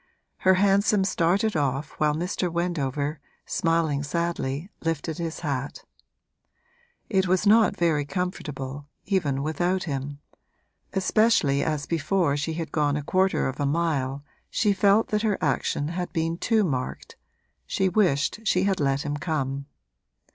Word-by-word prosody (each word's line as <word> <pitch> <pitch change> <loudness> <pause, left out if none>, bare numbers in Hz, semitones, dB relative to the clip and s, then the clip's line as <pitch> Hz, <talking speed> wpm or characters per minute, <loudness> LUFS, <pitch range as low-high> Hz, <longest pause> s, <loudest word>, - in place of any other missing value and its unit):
Her 190 0 +4
hansom 200 +1 +3
started 190 +3 +1
off 140 -1 -1
while 150 -1 +2
Mr. 180 +1 -2
Wendover, 150 -4 -1 0.3
smiling 165 -4 +1
sadly, 165 +1 -2
lifted 165 0 -2
his 165 -1 -4
hat. 140 -3 -3 1.2
It 190 -3 +1
was 185 +3 +2
not 220 +1 +5
very 160 -4 +2
comfortable, 145 -5 -4 0.2
even 150 -9 0
without 175 +5 0
him; 140 -1 -4 0.8
especially 190 -7 +3
as 150 -3 -1
before 165 -1 +1
she 150 +3 -2
had 165 0 -4
gone 145 -2 +1
a 150 - -4
quarter 185 +5 +1
of 130 +2 -5
a 145 - +1
mile 140 -3 -1 0.3
she 210 -2 +2
felt 200 +3 +3
that 210 0 +1
her 215 -3 +1
action 145 0 0
had 175 +1 -4
been 165 -1 0
too 225 -2 +2
marked 130 -8 -3 0.5
she 190 - +1
wished 180 -4 +2
she 185 -3 +2
had 195 -1 +1
let 140 -1 +1
him 145 0 -2
come. 140 -3 -2
165 Hz, 140 wpm, -25 LUFS, 145-190 Hz, 1.2 s, not